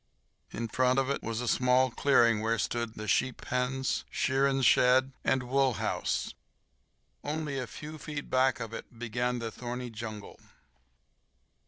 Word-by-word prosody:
In 115 +1 -4
front 125 +3 +2
of 135 0 +1
it - - -2
was 115 +1 -3
a 125 - -3
small 125 +1 +3
clearing 115 -5 +3
where 115 +1 +1
stood 115 +1 -2
the 110 - -6
sheep 130 +5 +1
pens, 125 +1 -1
shearing 135 0 +1
shed, 130 +2 +5
and 130 -1 +1
wool 130 +1 +2
house. - - -2 0.9
Only 150 -2 -3
a 125 - -4
few 155 +4 -9
feet 145 -1 -6
back 130 +1 +2
of 115 0 -6
it 115 - -9
began 120 +1 -1
the 115 -2 -4
thorny 125 0 -5
jungle. 110 -2 -8
125 Hz, 150 wpm, -30 LUFS, 115-135 Hz, 0.9 s, shed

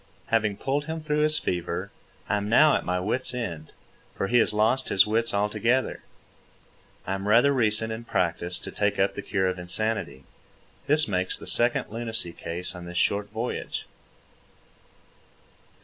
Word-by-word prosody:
Having 105 -3 +1
pulled 140 +5 -1
him 160 +1 -4
through 150 -1 -1
his 155 0 +2
fever, 90 +2 -3 0.4
I 105 - +1
am 100 0 -3
now 150 +6 +6
at - - -1
my 90 0 -1
wit's 125 +7 -1
end, 85 -11 -5 0.4
for - - -1
he 120 - +4
has - - +4
lost 110 +5 +2
his 95 - +5
wits 115 +2 +1
altogether. 105 +5 0 1.0
I - - -2
am 95 +1 -4
rather 120 +7 +5
recent 110 -3 +2
in 115 +1 -7
practice 85 -2 0
to - - -6
take 105 -1 0
up 95 0 +2
the - - -5
cure 95 -1 -1
of 90 0 -2
insanity. 95 -5 -2 0.6
This 150 +1 +5
makes 95 -2 -1
the - - -11
second 120 -2 +2
lunacy 115 -6 -3
case 85 +3 -5
on 90 -1 -9
this 85 0 -6
short 100 +2 +1
voyage. 115 +4 -4
105 Hz, 165 wpm, -26 LUFS, 95-120 Hz, 1.0 s, now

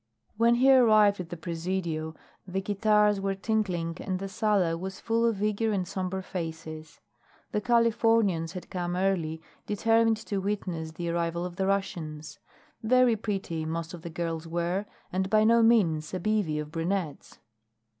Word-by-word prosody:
When 230 +2 +4
he 265 +3 +5
arrived 215 -5 +5
at 175 -2 -6
the 175 - -6
Presidio 165 -1 -3 0.3
the 190 +1 -2
guitars 210 +1 +2
were 195 0 -1
tinkling 190 -5 -1
and 185 -2 -2
the 195 +1 -5
sala 200 -5 +1
was 190 +3 -6
full 230 0 +1
of 210 -3 -1
eager 215 +1 +1
and 190 -3 -1
somber 190 +1 -3
faces. 160 -3 -7 0.5
The 210 - -1
Californians 225 -7 +2
had 180 - -8
come 175 -1 -2
early, 175 -4 -1 0.2
determined 225 +2 +3
to 205 -3 -3
witness 180 -5 -3
the 170 +1 -4
arrival 170 0 -1
of 180 -1 -6
the 190 - 0
Russians. 155 -7 -3 0.4
Very 250 +1 +4
pretty 195 -6 -3
most 165 +2 -4
of 175 - -8
the 170 - -7
girls 165 -1 -4
were, 175 +4 -2 0.3
and 190 +1 0
by 215 0 +4
no 230 +1 +5
means 175 -10 +3
a - - -2
bevy 200 -5 0
of 150 0 -5
brunettes. 165 -1 -3
190 Hz, 160 wpm, -28 LUFS, 165-215 Hz, 0.5 s, he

